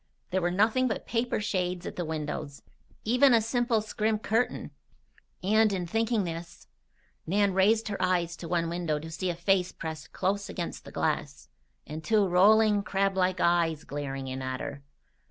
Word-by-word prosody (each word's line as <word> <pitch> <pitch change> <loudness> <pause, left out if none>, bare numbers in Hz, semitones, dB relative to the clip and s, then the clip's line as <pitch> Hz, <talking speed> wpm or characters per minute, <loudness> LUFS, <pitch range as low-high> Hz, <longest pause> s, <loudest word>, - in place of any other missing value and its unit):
There 190 +1 +1
were 175 - +1
nothing 220 +8 +2
but 220 - -3
paper 240 0 -1
shades 180 -3 -2
at - - -5
the 175 - -2
windows. 150 -3 -5 0.4
Even 250 +3 +5
a - - +5
simple 235 0 +1
scrim 215 0 -1
curtain 225 +2 -1 0.7
And, 215 +2 +4
in 185 -3 -2
thinking 225 +4 +1
of - - -2
this, 165 0 -7 0.6
Nan 200 +2 +2
raised 215 +4 +3
her 200 - -4
eyes 175 -2 +1
to 170 - -7
one 170 0 0
window 170 -2 -1
to 160 +2 -7
see 170 +3 -2
a 175 - -1
face 180 +1 +1
pressed 160 -1 -7
close 200 +1 -1
against 175 - -5
the - - -10
glass, - - -2 0.4
and 155 +2 -7
two 210 +3 +3
rolling, 205 +3 +5
crablike 190 -2 0
eyes 170 -3 +2
glaring 135 -2 -5
in 130 0 -4
at 130 0 -3
her. 145 -1 -6
185 Hz, 170 wpm, -28 LUFS, 165-215 Hz, 0.7 s, Even